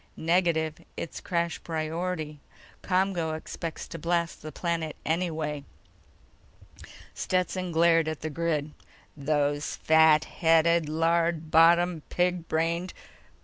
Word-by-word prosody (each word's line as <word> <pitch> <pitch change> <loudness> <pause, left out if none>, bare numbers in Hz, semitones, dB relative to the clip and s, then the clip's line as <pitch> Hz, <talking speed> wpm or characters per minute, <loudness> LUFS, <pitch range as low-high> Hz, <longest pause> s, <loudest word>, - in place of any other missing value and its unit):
"Negative. 165 -2 +1
It's 170 - -6
crash 170 -1 -2
priority. 160 -1 -3 0.4
ComGO 180 -4 0
expects 165 +1 -6
to 165 - -7
blast 170 +1 -1
the 155 - -7
planet 165 -3 -2
anyway." 160 -3 -2 1.5
Stetson 185 0 -1
glared 165 -1 +4
at 155 -1 -4
the 155 - -4
grid. 155 -1 -1 0.4
"Those 145 0 -1
fat 160 -1 +5
headed, 165 -1 +3
lard 165 0 +1
bottomed, 170 0 +4
pig 180 -1 0
brained 170 +3 -1
165 Hz, 105 wpm, -27 LUFS, 155-170 Hz, 1.5 s, fat